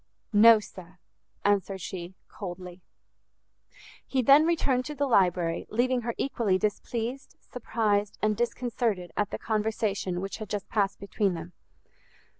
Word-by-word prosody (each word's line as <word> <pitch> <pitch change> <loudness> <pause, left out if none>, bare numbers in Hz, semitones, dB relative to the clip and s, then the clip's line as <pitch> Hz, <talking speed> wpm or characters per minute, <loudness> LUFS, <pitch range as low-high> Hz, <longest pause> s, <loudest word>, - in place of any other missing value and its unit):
"No, 220 +2 +8
sir," 185 -3 -12 0.5
answered 200 -1 +1
she, 180 0 -7
coldly. 180 -2 -8 1.3
He 260 -2 0
then 280 +6 +7
returned 275 -7 +1
to 300 - -6
the 285 +1 0
library, 180 -8 +2
leaving 245 +2 +1
her 235 0 -3
equally 225 -8 +1
displeased, 230 +5 -3
surprised, 210 -4 -1
and 215 0 +1
disconcerted 235 -5 -1
at 205 - 0
the - - -4
conversation 210 -4 -1
which 195 +1 -5
had 215 -3 -7
just 205 -1 -3
passed 200 -3 0
between 200 -1 -1
them. 170 +2 -8
210 Hz, 130 wpm, -28 LUFS, 190-240 Hz, 1.3 s, No